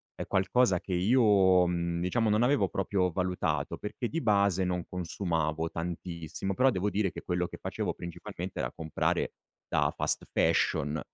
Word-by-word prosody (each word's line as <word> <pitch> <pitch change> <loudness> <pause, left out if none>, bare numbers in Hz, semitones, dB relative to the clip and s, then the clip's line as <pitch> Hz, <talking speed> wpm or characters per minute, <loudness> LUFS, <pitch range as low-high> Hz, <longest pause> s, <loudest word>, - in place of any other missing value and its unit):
è - - -5
qualcosa 95 +1 +2
che 95 - -5
io, 95 -3 +4
mhmm, 85 -1 -1
diciamo 110 +5 +1
non 105 +2 +3
avevo 120 -5 +3
proprio 95 -1 0
valutato 90 +1 -1
perché 105 +3 -4
di 165 - -2
base 100 -4 +3
non 90 -1 -1
consumavo 80 -3 -2
tantissimo, 85 +2 -4
però 130 +4 +4
devo 95 -1 0
dire 100 -2 0
che - - -8
quello 90 0 -1
che - - -9
facevo - - -2
principalmente 85 -1 -7
era - - -2
comprare 80 -1 -1 0.3
da - - +1
fast - - -1
fashion 75 +2 +2
90 Hz, 155 wpm, -29 LUFS, 85-100 Hz, 0.3 s, io